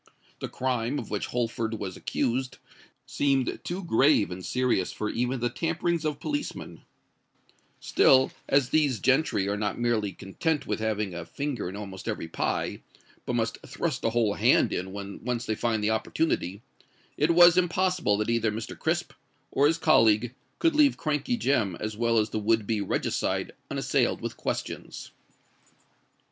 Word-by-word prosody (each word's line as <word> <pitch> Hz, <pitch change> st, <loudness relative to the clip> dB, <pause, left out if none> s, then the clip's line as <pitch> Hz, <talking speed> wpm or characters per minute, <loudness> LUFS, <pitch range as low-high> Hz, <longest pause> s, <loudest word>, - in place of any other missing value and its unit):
The -, -, -5 dB
crime 125 Hz, +1 st, -1 dB
of 110 Hz, -, -6 dB
which 105 Hz, -, -2 dB
Holford 115 Hz, -2 st, -2 dB
was 100 Hz, -4 st, -5 dB
accused 130 Hz, +2 st, -2 dB, 0.5 s
seemed 135 Hz, -3 st, 0 dB
too 185 Hz, +2 st, -4 dB
grave 135 Hz, -, +3 dB
and 90 Hz, +1 st, -6 dB
serious 125 Hz, -7 st, 0 dB
for 105 Hz, 0 st, -3 dB
even 125 Hz, +1 st, -1 dB
the 120 Hz, -, +1 dB
tamperings 165 Hz, +2 st, -1 dB
of 150 Hz, -2 st, -1 dB
policemen: 290 Hz, -1 st, -4 dB, 1.0 s
still 130 Hz, 0 st, +4 dB, 0.2 s
as 140 Hz, -2 st, +3 dB
these 145 Hz, -6 st, +2 dB
gentry 135 Hz, -7 st, +2 dB
are 100 Hz, -, 0 dB
not 105 Hz, -2 st, -2 dB
merely 115 Hz, -4 st, +1 dB
content 150 Hz, -, -2 dB
with -, -, -2 dB
having 105 Hz, -3 st, -1 dB
a 85 Hz, 0 st, -5 dB
finger 120 Hz, -, -4 dB
in 95 Hz, -, -8 dB
almost 100 Hz, -1 st, -8 dB
every 105 Hz, -7 st, -3 dB
pie, 80 Hz, -, -2 dB, 0.5 s
but -, -, -1 dB
must 115 Hz, -1 st, -1 dB
thrust 145 Hz, 0 st, -3 dB
a -, -, +2 dB
whole 115 Hz, -3 st, +1 dB
hand -, -, +3 dB
in 95 Hz, +1 st, -3 dB
when 100 Hz, 0 st, -7 dB
once 120 Hz, 0 st, -2 dB
they 110 Hz, -, 0 dB
find 110 Hz, -1 st, -1 dB
the 105 Hz, -, +2 dB
opportunity, 110 Hz, -, -1 dB, 0.5 s
it 150 Hz, -, +2 dB
was 175 Hz, 0 st, +8 dB
impossible 180 Hz, -, +2 dB
that 105 Hz, +2 st, -1 dB
either 115 Hz, -2 st, +1 dB
Mr. 110 Hz, +2 st, -5 dB
Crisp -, -, -1 dB, 0.4 s
or 140 Hz, +2 st, +4 dB
his 165 Hz, +2 st, +2 dB
colleague 115 Hz, -7 st, +4 dB, 0.2 s
could 330 Hz, -2 st, +2 dB
leave 295 Hz, -2 st, +5 dB
Crankey 150 Hz, -, -1 dB
Jem 115 Hz, -, +1 dB
as 110 Hz, 0 st, -4 dB
well 115 Hz, +1 st, +1 dB
as 110 Hz, 0 st, +1 dB
the 110 Hz, -, -1 dB
would 110 Hz, 0 st, +2 dB
be 110 Hz, -1 st, 0 dB
regicide 100 Hz, -, -1 dB, 0.2 s
unassailed -, -, 0 dB
with -, -, -5 dB
questions. -, -, -5 dB
120 Hz, 160 wpm, -27 LUFS, 105-145 Hz, 1.0 s, was